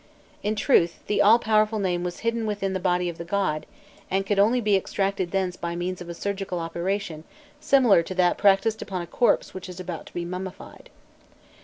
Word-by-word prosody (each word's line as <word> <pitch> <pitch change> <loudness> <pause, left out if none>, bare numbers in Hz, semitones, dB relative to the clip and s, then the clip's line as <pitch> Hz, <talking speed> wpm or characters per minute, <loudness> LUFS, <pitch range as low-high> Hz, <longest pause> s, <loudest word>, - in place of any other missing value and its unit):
In 210 +1 -1
truth, 190 -7 +2
the 210 - +1
all 215 +3 +7
powerful 215 -1 +2
name 180 -3 -1
was 180 -1 -5
hidden 230 -1 -1
within 200 -2 -2
the 190 - -1
body 180 -1 +1
of 170 -1 -5
the - - -4
god, 170 -4 -1 0.4
and 195 +1 0
could 200 0 0
only 225 +5 +4
be 210 -3 +2
extracted 195 -1 -1
thence 190 -1 -1
by 170 -1 -4
means 180 +1 -3
of 175 - -8
a 170 - -5
surgical 195 0 -3
operation 170 0 -3 0.4
similar 270 - +5
to 185 +3 -6
that 180 -1 +3
practised 205 +2 +3
upon 185 -3 -4
a - - -6
corpse 235 +7 +1
which 185 0 -8
is 180 0 -9
about 180 -3 -6
to - - -14
be 175 -1 -2
mummified. 180 +1 -8
190 Hz, 200 wpm, -25 LUFS, 175-205 Hz, 0.4 s, all